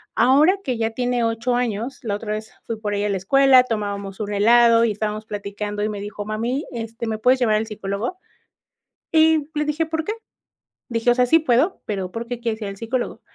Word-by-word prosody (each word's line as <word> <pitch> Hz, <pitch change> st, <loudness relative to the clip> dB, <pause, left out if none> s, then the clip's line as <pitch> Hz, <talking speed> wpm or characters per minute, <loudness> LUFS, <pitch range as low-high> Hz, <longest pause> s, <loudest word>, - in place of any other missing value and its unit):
ahora 300 Hz, +10 st, +5 dB
que 255 Hz, -7 st, -2 dB
ya 225 Hz, 0 st, -1 dB
tiene 245 Hz, 0 st, 0 dB
8 230 Hz, +2 st, 0 dB
años, 240 Hz, +1 st, -2 dB
la 205 Hz, -, -1 dB
otra 210 Hz, 0 st, -5 dB
vez 215 Hz, +1 st, -5 dB
fui 230 Hz, -, -4 dB
por 210 Hz, -1 st, -3 dB
ella 205 Hz, +1 st, 0 dB
a -, -, -2 dB
la 195 Hz, -, 0 dB
escuela, 265 Hz, +6 st, +5 dB
tomábamos 200 Hz, -3 st, -4 dB
un 205 Hz, 0 st, -3 dB
helado 230 Hz, +2 st, +5 dB
y 220 Hz, -, +1 dB
estábamos 215 Hz, +1 st, -3 dB
platicando 205 Hz, 0 st, -4 dB
y 215 Hz, -, 0 dB
me 205 Hz, -1 st, -5 dB
dijo: 205 Hz, 0 st, -6 dB
"Mami, 230 Hz, +7 st, -2 dB
este, 230 Hz, 0 st, -5 dB
¿me 220 Hz, -1 st, -2 dB
puedes 250 Hz, +4 st, +3 dB
llevar 215 Hz, -3 st, +3 dB
al 220 Hz, +1 st, -2 dB
psicólogo?", 210 Hz, -, -4 dB, 0.9 s
y 315 Hz, -2 st, +4 dB
le 300 Hz, -, 0 dB
dije: 300 Hz, +2 st, 0 dB
"¿Por 320 Hz, 0 st, -2 dB
qué?", 425 Hz, -, -2 dB, 0.8 s
dije: 235 Hz, 0 st, +2 dB
"O -, -, +2 dB
sea, 250 Hz, 0 st, +3 dB
sí 325 Hz, +7 st, +5 dB
puedo, 305 Hz, +4 st, +1 dB
pero, 195 Hz, -3 st, -3 dB
¿por 230 Hz, +1 st, -5 dB
qué 245 Hz, -1 st, -4 dB
quieres 230 Hz, -2 st, -3 dB
ir 200 Hz, -, -3 dB
al 195 Hz, -, -8 dB
psicólogo?", 235 Hz, +3 st, -3 dB
230 Hz, 215 wpm, -22 LUFS, 210-250 Hz, 0.9 s, ahora